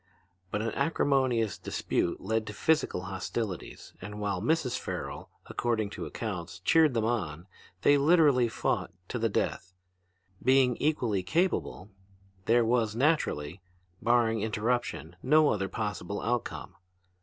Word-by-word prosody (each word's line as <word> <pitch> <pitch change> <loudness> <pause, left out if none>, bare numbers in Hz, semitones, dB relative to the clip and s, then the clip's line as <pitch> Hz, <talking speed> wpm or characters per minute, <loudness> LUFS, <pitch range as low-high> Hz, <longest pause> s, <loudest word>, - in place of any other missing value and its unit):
But 105 +3 -2
an 115 - -1
acrimonious 130 - +1
dispute 85 - -1
led 110 +2 -1
to 105 - -5
physical 155 - +1
hostilities, 95 +1 -5
and 105 0 -7
while 100 -3 -1
Mrs. 135 +1 +1
Farrel, - - -5 0.2
according 110 -4 -1
to - - -5
accounts, 95 -6 -5
cheered 155 - +4
them 110 -1 +1
on, 90 -9 -2 0.4
they 145 0 +5
literally 145 -5 +5
fought - - -1 0.2
to 125 - -3
the 115 0 +1
death. 90 -2 -2 0.7
Being 130 -1 +4
equally 120 -10 0
capable, 105 - -1 0.5
there 120 0 +4
was 115 -2 +1
naturally, 105 - 0 0.4
barring 115 -2 +2
interruption, 110 -6 -2
no 150 +3 +5
other 95 -2 -1
possible 105 -2 -3
outcome. 120 -1 -3
115 Hz, 125 wpm, -29 LUFS, 100-130 Hz, 0.7 s, they